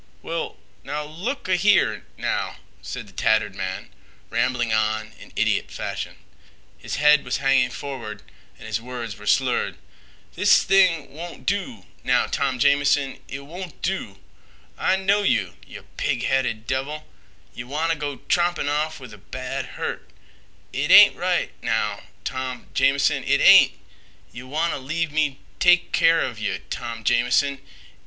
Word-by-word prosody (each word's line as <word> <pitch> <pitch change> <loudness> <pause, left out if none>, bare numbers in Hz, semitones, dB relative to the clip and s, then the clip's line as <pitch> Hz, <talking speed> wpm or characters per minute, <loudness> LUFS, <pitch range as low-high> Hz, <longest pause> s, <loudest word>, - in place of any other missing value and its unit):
"Well, 165 0 -4 0.3
now 150 +1 -4
look—a—here—now," 185 - 0 0.3
said 125 -3 -6
the 95 - -17
tattered 110 +1 +1
man, 95 0 -5 0.4
rambling 120 -3 0
on 110 0 0
in - - -14
idiot - - +1
fashion. - - -5 0.6
His - - -5
head 150 0 +5
was - - -2
hanging 135 -2 +3
forward 120 -7 -7 0.3
and - - -12
his 115 - -2
words 120 -4 -6
were 105 - -10
slurred. 130 +1 +1 0.6
"This - - +4
thing 180 -7 +3
won't 170 +3 -9
do, 185 - -2 0.2
now, - - +3
Tom 130 - -1
Jamison. 140 +1 +2
It 140 - -6
won't 170 +3 -9
do. 175 - -3 0.6
I - - +2
know 195 +2 +2
yeh, 100 - +1 0.2
yeh - - -10 0.2
pig - - -1
headed 125 -4 0
devil. 140 +4 -3 0.5
Yeh 120 - -7
wanta 155 +5 0
go 145 -2 -5
trompin' 175 -4 +1
off 150 +2 -1
with 125 -5 -11
a 105 - -13
bad 130 +5 -5
hurt. - - -4 0.6
It - - -1
ain't - - +9
right—now—Tom 130 -1 -3
Jamison—it 135 0 +2
ain't. - - +8 0.6
Yeh 120 - -8
wanta 155 +3 -1
leave 155 +4 -2
me 150 -3 0 0.2
take 180 -1 +4
keer 165 0 +4
of 120 -4 -3
yeh, 100 -3 -2
Tom 115 -2 -5
Jamison. 125 +4 +2
135 Hz, 135 wpm, -23 LUFS, 120-160 Hz, 0.6 s, ain't